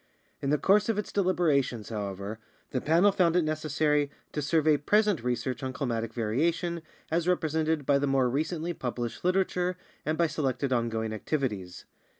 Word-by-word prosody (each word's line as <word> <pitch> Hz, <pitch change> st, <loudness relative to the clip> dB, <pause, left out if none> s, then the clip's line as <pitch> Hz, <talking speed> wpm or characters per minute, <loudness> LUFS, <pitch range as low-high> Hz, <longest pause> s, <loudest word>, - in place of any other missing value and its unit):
In 140 Hz, -, -1 dB
the 150 Hz, -, +3 dB
course 205 Hz, +7 st, +3 dB
of 225 Hz, -, +1 dB
its 210 Hz, -, -3 dB
deliberations, 155 Hz, -, +1 dB
however, 100 Hz, 0 st, -4 dB, 0.3 s
the 130 Hz, -, -1 dB
Panel 170 Hz, +6 st, +4 dB
found 175 Hz, -3 st, +2 dB
it 180 Hz, -, +4 dB
necessary 155 Hz, -1 st, +1 dB, 0.2 s
to 150 Hz, -, -2 dB
survey 155 Hz, +1 st, +3 dB
present 205 Hz, -, +2 dB
research 125 Hz, +2 st, -2 dB
on 130 Hz, -1 st, -3 dB
climatic 115 Hz, -5 st, -2 dB
variation, 160 Hz, +10 st, 0 dB, 0.3 s
as 165 Hz, +1 st, +1 dB
rep 180 Hz, -2 st, +2 dB
resented 160 Hz, -1 st, 0 dB
by 140 Hz, 0 st, +3 dB
the 145 Hz, -, 0 dB
more 135 Hz, -2 st, +3 dB
recently 160 Hz, +6 st, -1 dB
published 120 Hz, -5 st, -4 dB
literature 180 Hz, 0 st, +1 dB, 0.3 s
and 155 Hz, +1 st, -1 dB
by 170 Hz, -, +3 dB
selected 140 Hz, -4 st, -1 dB
on 120 Hz, -1 st, +1 dB
going 110 Hz, -1 st, -2 dB
activities. 105 Hz, -, -3 dB
150 Hz, 165 wpm, -28 LUFS, 125-170 Hz, 0.3 s, Panel